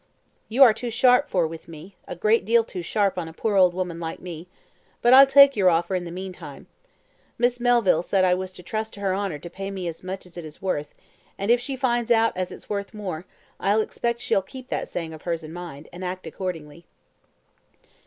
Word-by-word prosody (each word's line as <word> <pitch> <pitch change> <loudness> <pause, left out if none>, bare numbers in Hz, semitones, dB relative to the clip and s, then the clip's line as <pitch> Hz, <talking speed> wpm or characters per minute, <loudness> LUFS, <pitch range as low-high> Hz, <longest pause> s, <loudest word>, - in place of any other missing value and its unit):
"You 250 +5 +6
are 235 -4 +7
too 240 +2 -5
sharp 250 +4 +4
for 175 -3 +2
with 160 0 -8
me, 165 +4 -12
a - - -6
great 215 +6 +2
deal 230 +3 +3
too 185 -4 -7
sharp 195 +2 0
on 165 - -4
a 160 - -10
poor 210 +5 -1
old 180 -2 +5
woman 180 -2 -3
like 165 -1 -5
me, 175 -1 -8 0.5
but 240 +1 +4
I'll 270 +1 +10
take 275 0 +7
your 190 -3 +4
offer 170 +2 +1
in 180 -1 -1
the 170 - -7
meantime. 185 +1 -8 0.7
Miss 245 +1 +1
Melville 240 -9 +3
said 185 +2 +1
I 180 - +4
was 185 +1 -3
to 180 - -12
trust 220 +4 -4
to - - -11
her 195 -2 0
honour 195 -5 -2
to 160 - -10
pay 195 +3 -6
me 190 -3 -5
as 165 -1 -6
much 190 +1 -6
as 180 -1 -12
it 175 - -6
is 155 -1 -10
worth, 150 -6 -3 0.4
and 200 +4 0
if 240 - +5
she 270 +1 -4
finds 240 -3 0
out 225 -1 +3
as 185 0 -3
it's - - -11
worth 200 +1 -4
more, 185 -5 -5 0.3
I 200 +2 +2
expect 235 +2 -2
she'll 195 - +1
keep 255 +7 -12
that - - -2
saying 165 -2 -5
of 155 - -11
hers 170 -2 -3
in 155 +1 -9
mind, 170 -4 -8
and 180 +2 -8
act 185 0 -5
accordingly." 165 -2 -6
185 Hz, 225 wpm, -24 LUFS, 175-225 Hz, 0.7 s, I'll